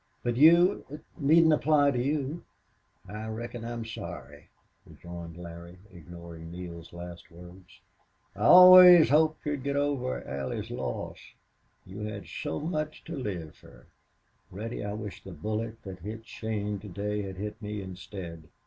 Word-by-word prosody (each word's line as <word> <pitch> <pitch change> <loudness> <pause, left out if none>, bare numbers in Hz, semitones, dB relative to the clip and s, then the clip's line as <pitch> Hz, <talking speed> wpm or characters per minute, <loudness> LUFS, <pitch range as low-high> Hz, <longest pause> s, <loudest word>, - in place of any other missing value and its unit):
"But 120 -1 -1
you 170 +7 +6
it 150 +2 -9
needn't 160 +1 +5
apply 150 -1 +3
to 125 -2 -1
you." 145 +3 -2 0.7
"I 105 +1 -7
reckon 115 +1 -6
I'm 115 -1 -5
sorry," 75 - -9 0.3
rejoined 85 -1 -10
Larry, 85 +1 -10 0.2
ignoring 85 -1 -11
Neale's 85 -1 -9
last 85 0 -10
words. 90 +2 -15 0.5
"I - - -13
always 180 - +9
hoped 155 +1 +3
you'd 145 -2 -2
get 140 +1 -2
over 140 -3 -1
Allie's 70 -1 -4
loss.... - - -5 0.7
You 95 +3 -10
had 105 -3 -5
so 80 -1 -5
much 155 -1 -4
to 165 - -7
live 90 - -5
fer." - - -18 0.6
"Reddy, 105 +5 -6
I 100 0 -4
wish 105 -1 -7
the 95 - -9
bullet 110 +7 -4
that 95 -2 -8
hit 110 +5 -8
Shane 105 -3 -4
to 105 - -11
day 105 +3 -3
had 95 -2 -7
hit 105 +3 -6
me 105 0 -5
instead.... 90 -3 -9
105 Hz, 150 wpm, -28 LUFS, 90-140 Hz, 0.7 s, always